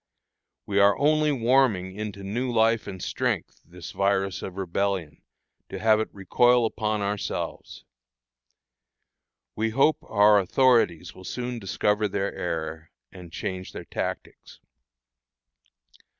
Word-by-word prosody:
We 100 -1 0
are 100 0 +5
only 150 +1 +3
warming 120 -7 +2
into 105 -2 -6
new 120 +6 -2
life 115 -1 +2
and 95 -2 -7
strength - - -2
this 90 +1 -10
virus 100 -1 0
of 95 0 -7
Rebellion, 95 -3 -2 0.5
to - - -6
have 110 -1 +3
it 110 - -2
recoil 120 +5 +3
upon 110 -1 -1
ourselves. 100 0 -4 1.7
We 110 +1 0
hope 135 +7 +3
our 105 0 +4
authorities 95 -5 +2
will 95 - -13
soon 125 +4 -4
discover 105 +1 0
their 100 0 -2
error, 80 -2 -4 0.2
and 90 -3 -12
change 95 +2 -5
their - - -8
tactics. - - -6
100 Hz, 120 wpm, -25 LUFS, 95-115 Hz, 1.7 s, are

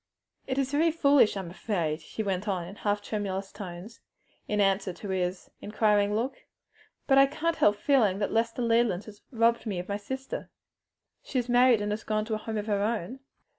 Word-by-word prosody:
"It 260 0 -2
is 270 -1 0
very 315 +3 +3
foolish, 285 -9 +4
I'm 185 -3 -5
afraid," 170 -6 -2
she 220 - -5
went 195 0 -2
on 180 -4 -1
in 195 +3 -10
half 205 0 -1
tremulous 195 -2 -3
tones, 195 +3 -9 0.5
in 210 - -1
answer 195 -1 +2
to 200 - -8
his 185 -1 -2
inquiring 210 -1 +2
look, 240 +5 -3 0.6
"but 270 -1 +5
I 275 - +7
can't 330 +4 -2
help 205 - +4
feeling 220 -6 +2
that 200 - -1
Lester 230 +2 0
Leland 230 -5 +2
has 210 -1 -13
robbed 230 -1 +2
me 200 -4 -2
of 175 - -5
my 200 - -2
sister." 265 +6 -6 0.7
"She 270 - -5
is 245 -1 0
married? 245 -2 +5
and 205 0 -2
has 215 +1 -3
gone 215 0 -1
to 220 - -3
a - - +1
home 220 0 -4
of 210 - -3
her 205 -2 0
own?" 225 +3 -2
210 Hz, 200 wpm, -28 LUFS, 200-240 Hz, 0.7 s, I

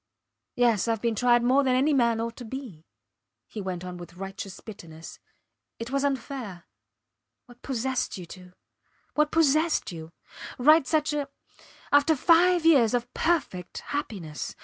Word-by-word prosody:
Yes; 235 -4 +2
Ive 225 -1 0
been 235 +1 0
tried 240 +2 +3
more 260 +3 +4
than 255 -1 +2
any 280 +4 +2
man 235 -4 +2
ought 230 0 -3
to 250 - -8
be, 225 - -8 0.6
he 215 - -7
went 185 -2 -5
on 180 0 -7
with 175 0 -11
righteous 195 +1 -7
bitterness. 165 -7 -11 0.6
It 230 +2 -7
was 275 0 0
unfair. 255 -9 -4 0.8
What 245 0 -18
possessed 260 -2 -2
you 180 - -8
to?... 180 +1 -13 0.6
What 300 0 +2
possessed 315 - +2
you?... 160 -1 -9 0.5
Write 300 +2 +5
such 305 +1 +1
a... 290 -2 -2 0.6
After 290 +3 +4
five 345 +3 +4
years 255 -8 +5
of 245 0 -3
perfect 265 - -1
happiness! 190 - -5
245 Hz, 150 wpm, -26 LUFS, 195-285 Hz, 0.8 s, Write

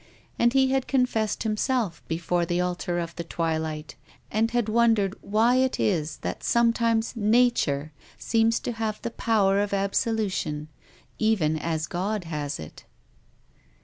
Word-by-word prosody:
And 235 +1 +4
he 265 -1 +3
had 265 -1 0
confessed 245 -5 0
himself, 220 -3 -1
before 170 +1 0
the 175 +1 -1
altar 180 -1 -1
of 170 -1 -4
the 170 - -3
twilight, 160 -2 -3 0.4
and 220 +2 +1
had 240 -2 0
wondered 220 -3 +2
why 225 +5 +2
it 260 0 +1
is 160 -6 0
that - - -4
some 235 -1 +3
times 230 0 0
Nature 215 - +2 0.3
seems 225 0 +2
to - - -3
have 220 -2 -3
the 235 - -3
power 200 -4 +2
of 205 -1 -2
absolu 205 +2 0
tion, 150 -3 -3 0.5
even 200 -9 +2
as 160 0 -2
God 195 +4 -2
has 150 -3 -4
it. 80 - -10
210 Hz, 145 wpm, -26 LUFS, 170-230 Hz, 0.5 s, And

